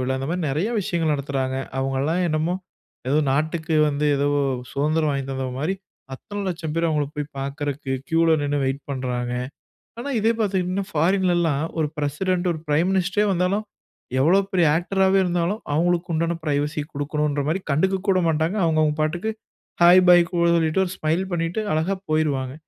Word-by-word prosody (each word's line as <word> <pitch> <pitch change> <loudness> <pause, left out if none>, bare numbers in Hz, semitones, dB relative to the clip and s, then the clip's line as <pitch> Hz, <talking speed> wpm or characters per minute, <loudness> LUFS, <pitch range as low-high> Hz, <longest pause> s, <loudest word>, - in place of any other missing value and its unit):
விழா, 130 +1 -1
அந்த 135 +1 -4
மாரி 180 +1 -2
நெறைய 155 +10 0
விஷயங்கள் 165 -4 0
நடத்துறாங்க. 135 -2 -2 0.2
அவங்கல்லாம் 135 +6 0
என்னமோ, 155 +2 0 0.6
ஏதோ 145 - +3
நாட்டுக்கு 160 +3 0
வந்து 150 +1 0
எதோ 140 +1 +1 0.4
சுதந்திரம் 155 +2 +1
வாங்கி 135 -1 -3
தந்தது 130 -1 -3
மாதிரி, 165 +6 0 0.4
அத்தனை 205 +9 -7
லட்சம் 165 -4 -4
பேர் 165 0 +2
அவங்களை 150 -3 0
போய் 150 0 -4
பார்க்குறதுக்கு 140 0 -4 0.2
கியூவுல 165 0 +3
நின்னு 145 0 0
வெயிட் 135 +1 -2
பண்றாங்க. 125 -2 -2 0.7
ஆனா 280 +4 -4
இதே 225 +2 +3
பார்த்தீங்கன்னா, 190 -1 -1
ஃபாரின்லல்லாம் 170 -2 +2 0.2
1 155 - +1
பிரசிடென்ட், 175 +5 -1
1 160 - -7
பிரைம் 160 +5 +2
மினிஸ்டரே 195 +2 +1
வந்தாலும், 185 +4 0 0.6
எவ்வளவு 190 +7 +3
பெரிய 175 -3 +3
ஆக்டராவே 190 +2 +2
இருந்தாலும், 175 +4 0
அவங்களுக்கு 175 +2 +1
உண்டான 165 +2 0
பிரைவசி 150 0 -1
குடுக்கணும்ன்ற 145 0 -1
மாரி 170 +5 0
கண்டுக்கக்கூட 190 +5 +1
மாட்டாங்க. 160 +5 0
அவங்கவங்க 155 -2 +2
பாட்டுக்கு 175 +8 -1 0.5
ஹை, 170 - +8 0.2
பை, 180 - +9
கூல்ன்னு 170 -1 +2
சொல்லிட்டு, 160 +2 +1
ஒரு 180 - -5
ஸ்மைல் 155 +3 0
பண்ணீட்டு 170 +4 -1
அழகாப் 185 +5 -2
போய்ருவாங்க. 140 -4 0
160 Hz, 155 wpm, -23 LUFS, 145-180 Hz, 0.7 s, பை